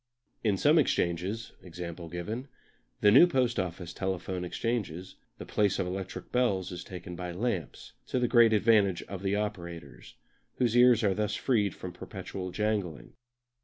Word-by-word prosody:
In 105 -4 +2
some 150 - +5
exchanges, 95 - 0
e.g. 90 -1 -12
the 85 - -3
new 135 +10 +8
Post 125 -7 +1
Office 90 -1 -4
telephone 95 -1 -3
exchanges, 95 -3 -3 0.2
the - - -8
place 100 -2 +1
of - - 0
electric 95 +1 -6
bells 100 -8 +1
is 90 - -6
taken 90 -1 -8
by 90 0 -5
lamps, 95 - -3
to - - -1
the 125 -1 +2
great 120 -2 +6
advantage 105 -4 +3
of 95 -2 -7
the 100 0 0
operators, 85 -12 -5 0.4
whose 120 -2 +1
ears 120 -2 +6
are 100 -2 +3
thus 105 +1 -1
freed 105 -7 +1
from 90 -1 -7
perpetual 95 -1 -6
jangling. 100 -4 -2
95 Hz, 150 wpm, -29 LUFS, 90-115 Hz, 0.4 s, new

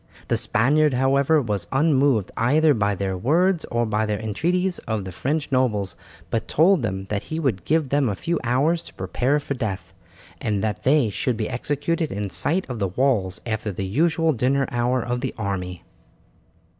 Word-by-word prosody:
The - - +3
Spaniard, 145 +6 +2
however, 140 +4 +3
was 105 -4 -2
unmoved 135 - +2
either 150 +6 +3
by 105 -4 +1
their 95 0 -2
words 165 - +2
or 120 0 0
by 110 0 0
the 105 -1 -1
entreaties 175 - -1
of 110 -4 -2
the 95 - -6
French 145 - -2
nobles 105 -9 +1 0.4
but 115 - -1
told 175 +2 +4
them 95 -4 -3
that 100 -1 -2
he 160 - -4
would 125 - -1
give 155 -3 +1
them 140 -3 +2
a 100 - -2
few 170 - -2
hours 140 +8 +2
to - - -12
prepare 125 +10 0
for 145 - -4
death, 100 -9 -4 0.5
and 105 -2 -1
that 110 -1 -2
they 135 -5 +3
should 120 +3 -1
be 110 - -2
executed 145 +6 -1
in 100 -1 -3
sight 170 +7 -1
of 125 -4 -5
the 100 - +1
walls 100 -3 0
after 110 -2 -2
the 95 +1 -4
usual 160 - +2
dinner 135 +3 +1
hour 120 0 0
of 125 +1 -2
the 130 - -3
army. 95 -4 -4
125 Hz, 180 wpm, -23 LUFS, 105-150 Hz, 0.5 s, told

